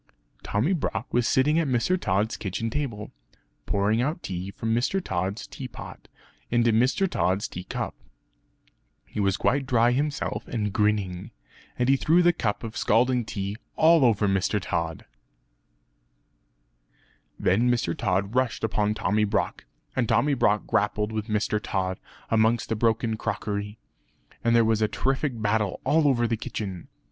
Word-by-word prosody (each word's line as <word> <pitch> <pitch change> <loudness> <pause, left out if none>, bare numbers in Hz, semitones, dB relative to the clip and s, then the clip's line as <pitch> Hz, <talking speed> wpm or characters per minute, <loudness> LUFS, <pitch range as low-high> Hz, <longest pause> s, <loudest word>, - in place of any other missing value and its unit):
Tommy 120 - 0
Brock 125 - -2
was 120 -1 +2
sitting 150 +5 +3
at 165 - 0
Mr. 130 +8 +2
Tod's 105 - 0
kitchen 110 +3 -3
table, 120 -7 -4 0.6
pouring 105 +3 +1
out 150 +7 -2
tea 95 0 -4
from 110 +3 -2
Mr. 120 +11 +1
Tod's 95 - -3
tea 130 - -7
pot - - -10 0.4
into 120 -1 +3
Mr. 125 - +3
Tod's 95 - 0
tea 90 +1 -8
cup. - - -4 1.1
He - - -7
was 100 -1 +2
quite 135 +4 +1
dry 120 -2 +4
himself 145 +3 -2
and 105 -4 -2
grinning; 100 -4 0 0.5
and 125 - +1
he 135 +1 +4
threw 170 +6 +3
the 175 0 +5
cup 105 -8 -2
of 110 0 -6
scalding 125 +1 +2
tea 100 0 -4 0.2
all 160 -1 +5
over 110 -4 +3
Mr. 95 +2 +1
Tod. 85 -3 -3 2.3
Then 115 +7 +2
Mr. 115 -9 0
Tod 100 +2 -1
rushed 125 -3 0
upon 105 -1 +1
Tommy 105 +1 +1
Brock, 105 - -1 0.3
and 120 -4 0
Tommy 120 +6 +3
Brock 105 -5 +2
grappled 105 +1 0
with 110 0 -3
Mr. 105 -1 0
Tod 95 -3 -2 0.3
amongst 115 +1 +2
the 115 - 0
broken 110 0 +1
crockery, 105 -1 -3 0.7
and 115 0 +3
there 115 -1 +5
was 110 -1 +2
a 110 - +3
terrific 130 +3 -1
battle 105 -2 0
all 150 +3 +3
over 120 -4 +2
the 115 -1 -1
kitchen. 95 -5 -5
110 Hz, 155 wpm, -26 LUFS, 100-125 Hz, 2.3 s, the